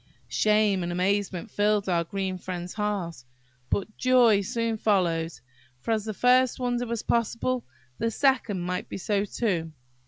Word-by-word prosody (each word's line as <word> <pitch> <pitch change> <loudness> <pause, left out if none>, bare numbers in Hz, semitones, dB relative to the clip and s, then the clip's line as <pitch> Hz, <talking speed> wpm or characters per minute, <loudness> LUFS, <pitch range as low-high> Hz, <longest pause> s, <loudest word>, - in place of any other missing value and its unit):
Shame 210 -3 +3
and 175 0 -2
amazement 190 +2 -1
filled 205 -1 +1
our 170 -2 +2
green 190 +1 -3
friend's 180 -1 -5
heart, 200 - -3 0.5
but 210 +2 -2
joy 245 -5 +5
soon 230 +3 -1
followed; 170 -6 +1 0.5
for, 225 - -3
as 220 -2 0
the 215 - -3
first 255 +2 +3
wonder 245 -1 -1
was 230 -1 -3
possible, 235 +2 0 0.3
the 230 - +1
second 230 -6 +1
might 180 +1 -3
be - - -5
so 200 +1 0
too. 175 -7 -2
205 Hz, 150 wpm, -27 LUFS, 180-230 Hz, 0.5 s, joy